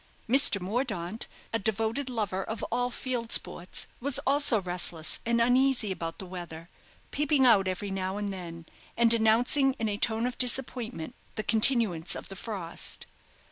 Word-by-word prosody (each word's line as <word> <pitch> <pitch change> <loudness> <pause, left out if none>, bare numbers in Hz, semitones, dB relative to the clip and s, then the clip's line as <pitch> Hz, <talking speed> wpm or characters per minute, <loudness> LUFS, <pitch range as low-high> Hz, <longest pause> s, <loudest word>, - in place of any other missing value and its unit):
Mr. 245 -4 +4
Mordaunt, 205 -1 -3 0.3
a 225 - +1
devoted 225 +6 -2
lover 205 -6 -2
of 220 +3 -6
all 245 +1 0
field 245 -2 -4
sports, 175 +2 -1
was 275 +2 +1
also 275 -4 +3
restless 175 -3 +3
and 235 0 +2
uneasy 245 -2 +2
about 165 -3 -5
the 190 - -8
weather, 175 -2 -9 0.4
peeping 290 -2 +2
out 200 -6 +5
every 185 +2 -4
now 190 0 -3
and 205 -1 -3
then, 170 -3 -9 0.3
and 235 0 +5
announcing, 240 +5 +3
in 225 - -2
a 205 -1 -3
tone 225 0 +1
of 250 0 -4
disappointment, 245 -7 -1 0.2
the 215 - -3
continuance 220 -7 +3
of - - -9
the 195 - -8
frost. 190 -5 -5
220 Hz, 155 wpm, -28 LUFS, 185-245 Hz, 0.4 s, out